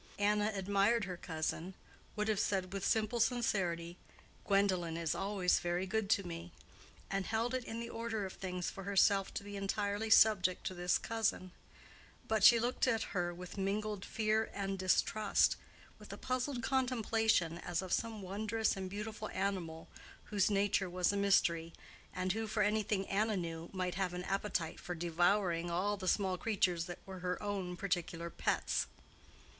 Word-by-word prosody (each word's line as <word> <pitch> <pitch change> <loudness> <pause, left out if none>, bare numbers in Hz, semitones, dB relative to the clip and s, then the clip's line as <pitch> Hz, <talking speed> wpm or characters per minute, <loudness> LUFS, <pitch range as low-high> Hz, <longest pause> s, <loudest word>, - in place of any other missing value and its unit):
Anna 210 +1 +2
admired 200 +4 +2
her 185 -2 -5
cousin—would 175 +6 -5
have 215 -2 +1
said 190 -2 0
with 195 -1 -3
simple 220 +3 +1
sincerity, 180 -8 0 0.5
"Gwendolen 185 -5 +2
is 165 -2 0
always 195 -2 +1
very 175 +1 -1
good 205 +1 -1
to 200 -1 +3
me," 170 0 -6 0.6
and 195 -1 -1
held 230 +2 0
it 255 -1 -1
in 225 - -5
the 235 0 -5
order 225 -3 -3
of 190 - -6
things 180 -2 -4
for 195 - -8
herself 195 0 +3
to - - -3
be 205 0 -8
entirely 205 +2 -1
subject 205 -5 +5
to - - -2
this 180 0 +1
cousin; 220 -5 -1 0.8
but 220 -3 +1
she 235 +2 +9
looked 245 +3 0
at 225 -3 +2
her 175 -3 0
with 180 +3 -8
mingled 205 +1 -1
fear 220 0 0
and 195 -1 -2
distrust, 200 +3 +3 0.4
with - - -11
a - - -6
puzzled 255 -1 -2
contemplation 225 -9 +1
as 175 +1 -2
of 185 - -3
some 225 -3 -2
wondrous 215 +3 0
and 190 -1 -4
beautiful 215 +2 -5
animal 185 -5 -3 0.4
whose 205 -1 +3
nature 200 -2 +1
was 180 +2 +1
a - - -1
mystery, 170 -5 +2 0.4
and 185 0 -1
who, 220 +2 -2
for 215 0 +1
anything 205 -1 0
Anna 210 +1 +1
knew, 165 -1 -4
might 185 -2 -2
have 185 -1 -1
an 180 - -4
appetite 195 -4 -2
for 180 - -5
devouring 175 +1 +1
all 190 +5 0
the 190 -2 -6
small 190 -2 +1
creatures 185 -6 +1
that 175 -1 -6
were 190 -1 -8
her 180 0 -2
own 190 -3 -3
particular 170 -2 -2
pets. - - 0
195 Hz, 165 wpm, -35 LUFS, 180-215 Hz, 0.8 s, she